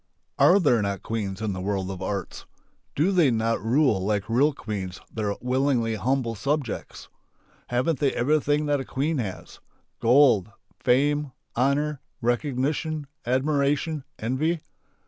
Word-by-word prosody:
Are 190 +3 +6
there 125 - +3
not 100 -1 -2
queens 105 -2 -3
in 105 -2 -1
the 95 - -5
world 95 -1 -2
of 95 -1 -7
arts? 100 0 -4 0.5
Do 160 +7 +2
they 175 -7 +4
not 115 -1 0
rule 115 -4 +2
like 105 0 0
real 135 +7 +4
queens 100 -8 -5
their 105 -2 -1
willingly 125 -2 +1
humble 120 +2 0
subjects? 140 +2 -3 0.6
Haven't 125 +5 0
they 140 -3 +2
everything 145 +3 +1
that 145 -1 +1
a - - -3
queen 145 +3 -1
has: 100 -6 -6 0.4
Gold, 120 -5 +5 0.3
fame, 145 +2 +2 0.2
honour, 140 +3 +1 0.2
recognition, 145 +5 -1 0.2
admiration, 145 +3 +1
envy? 150 +8 -1
130 Hz, 130 wpm, -25 LUFS, 110-145 Hz, 0.6 s, Are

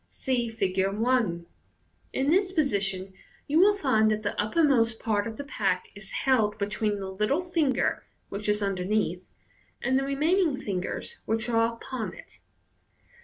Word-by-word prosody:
(See 245 -3 -1
Fig. 190 -4 0
1 225 -7 +1 0.3
) - - -39
In 270 +2 +1
this 375 +2 +3
position 195 - 0 0.3
you 300 +3 +2
will 405 +3 +5
find 220 - +3
that 215 0 -1
the 205 - -1
uppermost 230 -2 +2
part 210 -2 0
of 225 - -6
the 285 - -4
pack 195 -9 -1
is 200 -1 -10
held 220 -6 +3
between 210 +1 -1
the 190 -1 -5
little 210 - 0
finger, 330 -7 +1 0.2
which 210 +1 -4
is 210 0 +1
underneath, 190 -1 -1 0.5
and 260 0 +2
the - - -1
remaining 305 +3 +2
fingers, 190 -5 -4
which 225 +1 -1
are 230 0 +2
upon 240 -1 -5
it. - - -15
225 Hz, 155 wpm, -27 LUFS, 200-270 Hz, 0.5 s, will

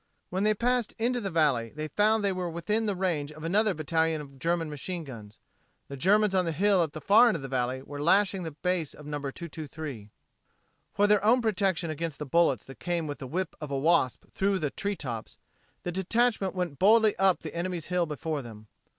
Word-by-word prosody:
When 185 +2 -1
they 215 0 +3
passed 245 +1 0
into 245 +2 0
the 195 - -2
valley 145 -9 +1
they 155 0 -4
found 215 +3 +2
they 200 - +2
were 185 -2 -3
within 210 +7 -1
the 205 - 0
range 165 -6 -1
of 155 +1 -11
another 200 +4 +2
battalion 160 +1 0
of 140 -2 -11
German 165 +2 0
machine 165 +4 -5
guns. 110 -7 -10 0.5
The 140 - -6
Germans 205 +7 +3
on 185 -1 +2
the 165 - -1
hill 195 +3 +3
at 160 -3 -1
the 155 - -6
far 220 +8 +6
end 230 - +2
of - - -5
the - - -4
valley 130 0 -2
were 145 +1 -7
lashing 195 +4 +3
the 165 - -4
base 180 -4 0
of 150 - -12
No. 150 0 -4
223. 145 - -7 0.8
For 205 - +2
their 205 -1 +4
own 235 +4 +5
protection 195 -7 0
against 160 -1 -4
the 150 - -5
bullets 140 -5 +2
that 135 - -12
came 175 -2 -1
with 145 -1 -5
the 130 - -6
whip 185 +7 -2
of 150 - -5
a 140 - -1
wasp 145 -3 +2
through 195 0 +1
the 150 -6 -2
tree 200 0 -2
tops, 120 - -6 0.5
the 175 - -2
detachment 195 +2 +1
went 175 -7 -3
boldly 220 +2 +5
up 190 -2 +3
the - - -7
enemy's 170 -1 -3
hill 180 -1 0
before 150 0 -3
them. 110 -3 -11
170 Hz, 215 wpm, -28 LUFS, 145-195 Hz, 0.8 s, far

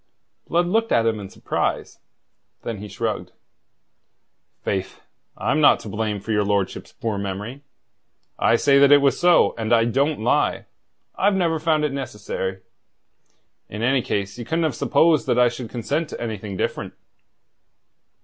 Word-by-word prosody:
Blood 175 +1 +2
looked 225 +5 0
at 115 - +3
him 110 -1 0
in 100 -2 -8
surprise. - - -3 0.6
Then 115 -3 -4
he 105 - -7
shrugged. - - -4 1.3
"Faith, 95 -1 -3 0.4
I'm 140 +8 0
not 145 - +6
to 110 - -8
blame 105 0 -2
for 110 - -6
your 105 -1 +2
lordship's 100 -2 -2
poor 110 -3 -3
memory. 100 +7 -5 0.8
I - - +4
say 140 +3 +4
that 140 0 +6
it 145 - +9
was 140 -1 +2
so; 175 0 +4
and 110 0 -2
I 115 -1 +5
don't 140 +6 0
lie. - - +1 0.5
I've 200 +1 +2
never 165 -4 +1
found 155 -1 +1
it 145 - -2
necessary. 105 -7 -4 1.1
In 105 +2 -5
any 130 +2 +3
case 100 0 -3
ye - - -4
couldn't 165 +6 -1
have 155 -4 0
supposed 160 +5 +2
that - - +1
I 125 -1 +5
should 120 -1 -7
consent 140 +7 -2
to - - -7
anything 105 -4 -5
different." - - -3
120 Hz, 160 wpm, -22 LUFS, 105-150 Hz, 1.3 s, it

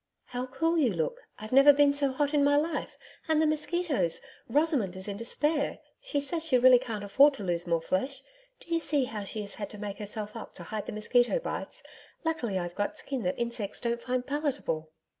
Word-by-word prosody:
'How 250 +1 -4
cool 325 +6 +1
you 260 -7 +3
look. 160 -3 -2 0.2
I've 215 0 -8
never 275 +3 +8
been 285 0 +4
so 285 -1 +1
hot 285 +2 0
in 290 -1 +4
my 285 0 +4
life. 305 +2 -1 0.3
And 315 -1 +3
the 315 - +4
mosquitoes! 305 - 0 0.3
Rosamond 280 - +2
is 190 +1 -6
in 200 - -3
despair. 290 +7 0 0.2
She - - -1
says 315 +3 -2
she 300 -6 +3
really 250 0 +7
can't 225 -5 -5
afford 275 +8 +5
to 210 - -7
lose 175 -1 -1
more 165 -1 +1
flesh. 265 +11 -2 0.4
Do 335 - -6
you 330 - +3
see 295 -4 +2
how 215 -5 -4
she 215 +2 -4
has 200 -1 -4
had 205 -2 -5
to 210 - -9
make 205 -1 -6
herself 210 +1 -5
up 225 - -8
to - - -8
hide 215 -1 -5
the - - -3
mosquito 240 - +2
bites? - - -5 0.4
Luckily, 245 -12 -1
I've 175 -1 -3
got 205 - -1
a - - -16
skin 270 -3 -4
that 180 -3 -1
insects 235 -4 -3
don't 235 -1 -1
find 250 0 -2
palatable....' 280 - -2
255 Hz, 215 wpm, -29 LUFS, 210-290 Hz, 0.4 s, never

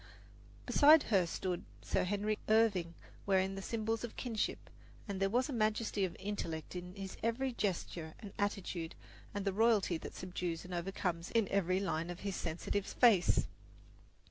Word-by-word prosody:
Beside 305 +2 +7
her 185 -3 +4
stood 180 +1 -2 0.2
Sir - - +1
Henry 205 +2 0
Irving, 200 -7 +3 0.3
wearing 190 0 +3
the 195 - -5
symbols 225 +2 -2
of 235 - -5
kingship; 230 -4 -2 0.4
and 200 -2 -3
there 195 0 +2
was 245 +5 +2
majesty 215 -3 +1
of 180 - -5
intellect 170 -6 -4
in 180 +1 -6
his 195 -1 -6
every 245 +3 0
gesture 175 -6 -2
and 205 -3 -9
attitude 190 -5 -2 0.4
and 205 -1 -4
the 195 - +1
royalty 210 -5 +3
that - - -8
subdues 180 -2 -4
and 180 - -7
overcomes 175 -1 -2
in 225 -3 +2
every 185 -1 +2
line 170 -3 -1
of 175 - -6
his 200 -2 -2
sensitive 175 +4 -2
face. 220 -8 +4
195 Hz, 155 wpm, -35 LUFS, 180-215 Hz, 0.4 s, Beside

